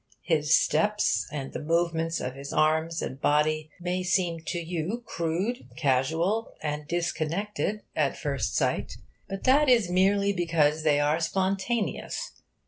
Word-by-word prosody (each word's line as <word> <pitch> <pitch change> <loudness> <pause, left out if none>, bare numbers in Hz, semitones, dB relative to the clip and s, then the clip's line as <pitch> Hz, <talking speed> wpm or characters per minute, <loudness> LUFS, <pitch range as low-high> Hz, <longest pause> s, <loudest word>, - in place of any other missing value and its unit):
His 160 -2 +3
steps, 210 0 +1
and 140 -3 -5
the - - -4
movements 165 +1 0
of 125 - -4
his 140 +1 -8
arms 160 +2 +1
and 135 +1 -6
body, 155 +1 +2
may 180 +1 -2
seem 180 -2 +1
to 175 - -2
you 175 +7 -3
crude, 185 +6 -2
casual, 160 - +1
and 150 -1 -3
disconnected 175 +5 -2
at 145 -3 +1
first 140 -6 -2
sight; - - 0 0.4
but 195 0 -5
that 275 +2 +5
is 230 -8 +4
merely 200 +2 +3
because 160 -4 +2
they 150 -2 +3
are 150 +2 +2
spontaneous. 195 +6 -1
165 Hz, 135 wpm, -27 LUFS, 155-195 Hz, 0.4 s, that